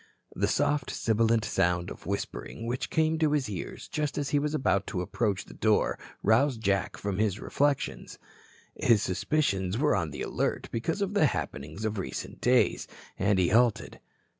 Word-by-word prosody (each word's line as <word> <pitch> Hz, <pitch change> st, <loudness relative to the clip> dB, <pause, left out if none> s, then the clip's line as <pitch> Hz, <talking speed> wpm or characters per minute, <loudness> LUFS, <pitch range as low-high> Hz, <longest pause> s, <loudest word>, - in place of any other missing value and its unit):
The 100 Hz, +3 st, +1 dB
soft 145 Hz, +4 st, +1 dB
sibilant 115 Hz, 0 st, +1 dB
sound 90 Hz, -3 st, +1 dB
of -, -, -10 dB
whispering 100 Hz, +3 st, -4 dB
which 120 Hz, +2 st, -2 dB
came 160 Hz, 0 st, +1 dB
to 155 Hz, -2 st, +2 dB
his 145 Hz, -3 st, +1 dB
ears 100 Hz, -5 st, -6 dB
just 150 Hz, -1 st, -2 dB
as 145 Hz, -1 st, -2 dB
he 145 Hz, -, +3 dB
was 150 Hz, +1 st, -1 dB
about 100 Hz, -8 st, +1 dB
to 90 Hz, -4 st, -2 dB
approach 105 Hz, 0 st, -1 dB
the -, -, -12 dB
door 110 Hz, -1 st, +1 dB, 0.2 s
roused 120 Hz, +4 st, +3 dB
Jack 100 Hz, -1 st, 0 dB
from 100 Hz, -1 st, -3 dB
his 105 Hz, -2 st, +1 dB
reflections. 145 Hz, -1 st, -1 dB, 0.6 s
His 110 Hz, -3 st, +3 dB
suspicions 95 Hz, -3 st, 0 dB
were 150 Hz, -1 st, +3 dB
on 85 Hz, -5 st, -1 dB
the 75 Hz, -, -5 dB
alert -, -, -2 dB
because 165 Hz, -, -1 dB
of 200 Hz, +1 st, -3 dB
the 180 Hz, -7 st, +4 dB
happenings 80 Hz, -, -4 dB
of 110 Hz, -1 st, -2 dB
recent 65 Hz, -9 st, -6 dB
days, 125 Hz, 0 st, +3 dB, 0.3 s
and 100 Hz, 0 st, +3 dB
he 90 Hz, -2 st, +3 dB
halted. 120 Hz, 0 st, +2 dB
110 Hz, 170 wpm, -28 LUFS, 100-145 Hz, 0.6 s, the